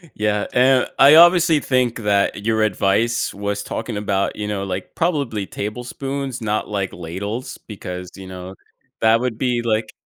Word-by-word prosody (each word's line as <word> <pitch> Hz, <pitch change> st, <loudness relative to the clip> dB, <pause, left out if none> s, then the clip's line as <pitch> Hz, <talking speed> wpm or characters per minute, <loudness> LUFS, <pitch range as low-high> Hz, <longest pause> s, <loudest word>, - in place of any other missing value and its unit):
Yeah, 105 Hz, -1 st, 0 dB
and 130 Hz, +1 st, +4 dB
I 140 Hz, +3 st, +8 dB
obviously 170 Hz, -2 st, +6 dB
think 125 Hz, -4 st, 0 dB
that 100 Hz, 0 st, 0 dB
your 110 Hz, -1 st, +1 dB
advice 110 Hz, +3 st, +1 dB
was 100 Hz, 0 st, -3 dB
talking 110 Hz, -1 st, -5 dB
about, 100 Hz, -1 st, -1 dB
you 105 Hz, -1 st, -4 dB
know, 100 Hz, -2 st, -3 dB
like, 95 Hz, -1 st, -5 dB
probably 140 Hz, -, -1 dB
tablespoons, 125 Hz, +4 st, -5 dB
not, 105 Hz, -1 st, -2 dB
like, 100 Hz, -2 st, -2 dB
ladles 100 Hz, +8 st, -5 dB
because, 90 Hz, -3 st, -7 dB
you 95 Hz, -1 st, -10 dB
know, 95 Hz, 0 st, -8 dB, 0.5 s
that 110 Hz, +1 st, +4 dB
would 125 Hz, -3 st, -2 dB
be 125 Hz, -2 st, 0 dB
like 110 Hz, -1 st, -1 dB
110 Hz, 155 wpm, -20 LUFS, 100-125 Hz, 0.5 s, I